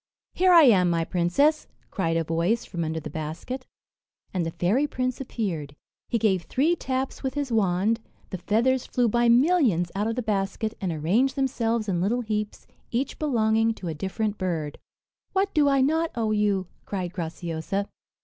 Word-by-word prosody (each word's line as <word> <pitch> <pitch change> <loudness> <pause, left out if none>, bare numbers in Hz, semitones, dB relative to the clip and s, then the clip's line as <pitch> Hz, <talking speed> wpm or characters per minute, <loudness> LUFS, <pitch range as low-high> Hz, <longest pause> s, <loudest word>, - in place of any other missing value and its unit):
"Here 370 0 +3
I 340 -2 +9
am, 190 -9 +5
my 165 -1 +1
princess," 190 - +2 0.2
cried 165 -4 0
a 165 - +1
voice 170 +8 0
from 170 -2 -4
under 160 0 -2
the 155 -1 -8
basket; 160 - -5 0.7
and 185 -2 0
the 165 - -2
fairy 205 - +1
prince 255 -1 -2
appeared. 170 - -4 0.3
He 235 - +1
gave 200 -5 +2
three 295 - +1
taps 265 -3 -3
with 265 0 -3
his 285 -3 -2
wand 210 +1 +2 0.3
the 185 - -4
feathers 235 +7 +1
flew 245 -1 +1
by 240 +2 +2
millions 240 - +3
out 205 +3 -1
of 225 - -1
the 250 - -2
basket, 210 +1 -1
and 185 -3 -1
arranged 200 - +1
themselves 235 -5 0
in 175 -3 0
little 230 +7 +1
heaps, 215 -2 -3 0.2
each 255 +3 -2
belonging 225 -5 +2
to 180 - -6
a - - -2
different 200 +6 -3
bird. 165 -6 -3 0.5
"What 390 +1 +1
do 295 -2 +4
I 275 -1 +3
not 320 +4 +2
owe 225 -2 0
you?" 205 -3 +1 0.2
cried 185 -3 -3
Graciosa. 170 +3 -3
215 Hz, 175 wpm, -25 LUFS, 175-255 Hz, 0.7 s, I